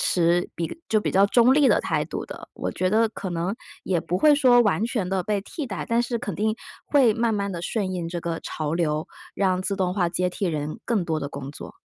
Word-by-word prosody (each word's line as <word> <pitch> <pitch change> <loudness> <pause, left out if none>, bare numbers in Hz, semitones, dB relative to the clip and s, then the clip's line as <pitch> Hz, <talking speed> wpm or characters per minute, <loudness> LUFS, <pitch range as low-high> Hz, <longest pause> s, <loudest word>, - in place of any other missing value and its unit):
持 175 0 +2
比 170 - -4
就 215 - +3
比 - - -1
较 195 +1 +5
持 - - -13
中 245 +1 +6
立 290 -1 +5
的 - - +4
态 - - -1
度 - - -5
的， - - -9
我 - - -3
觉 185 - 0
得 225 +2 +3
可 195 -4 -6
能 175 +3 -2 0.3
也 180 -3 +1
不 175 - -2
会 305 +6 +6
说 255 -4 +5
完 210 -2 +2
全 225 -6 -2
地 190 0 0
被 210 -1 0
替 280 +9 -6
代。 210 - -4
但 230 0 +2
是 240 -1 -2
肯 205 -4 -4
定 215 +2 +1 0.3
会 265 -6 +4
慢 230 0 +1
慢 200 -1 -1
地 170 - -4
顺 195 -1 -2
应 175 -2 -3
这 175 0 -4
个 165 -1 -3
潮 155 -1 -4
流， 155 -2 0 0.3
让 185 -2 +1
自 195 +1 -1
动 185 -2 0
化 180 -4 +1
接 180 +1 0
替 195 - -2
人 155 +3 -3
更 215 -6 0
多 160 -2 -1
的 140 - -3
工 140 -1 -7
作。 - - -10
190 Hz, 265 characters per minute, -24 LUFS, 170-225 Hz, 0.3 s, 中